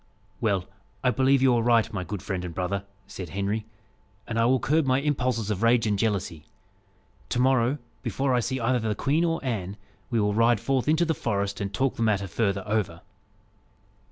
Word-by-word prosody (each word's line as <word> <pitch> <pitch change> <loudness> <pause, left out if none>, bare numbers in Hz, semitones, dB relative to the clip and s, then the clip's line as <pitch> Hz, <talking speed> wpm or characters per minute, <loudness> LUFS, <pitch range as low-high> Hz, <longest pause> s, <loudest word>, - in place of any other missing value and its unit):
"Well, 100 -4 0 0.4
I 125 - +4
believe 135 +1 +3
you 130 -2 +5
are 120 - +2
right, 115 -1 +3
my 95 -3 -2
good 90 +2 -6
friend 95 -2 -3
and 85 -2 -6
brother," 95 +2 -2 0.2
said 90 -4 -8
Henry, 100 +5 -2 0.6
"and 115 -1 -2
I 115 - +4
will 130 +2 +3
curb 150 +4 +1
my 130 0 +3
impulses 130 -7 0
of 100 -1 -2
rage 115 0 +4
and 105 -2 0
jealousy. 100 -8 -1 0.9
To - - -1
morrow, 130 +1 +3 0.2
before 130 +3 -1
I 125 - +3
see 130 +3 -2
either 125 +2 +1
the 110 -2 -1
queen 150 +9 +1
or 165 -1 +1
Anne, 100 -5 -3 0.3
we 115 - +1
will 105 -1 +1
ride 115 +1 +3
forth 130 +3 0
into 160 +3 +3
the 160 - +1
forest, 100 -7 -2
and 100 -1 -2
talk 135 +5 0
the - - -4
matter 105 -3 +2
further 100 +1 -1
over." 105 -2 -1
115 Hz, 195 wpm, -26 LUFS, 100-130 Hz, 0.9 s, you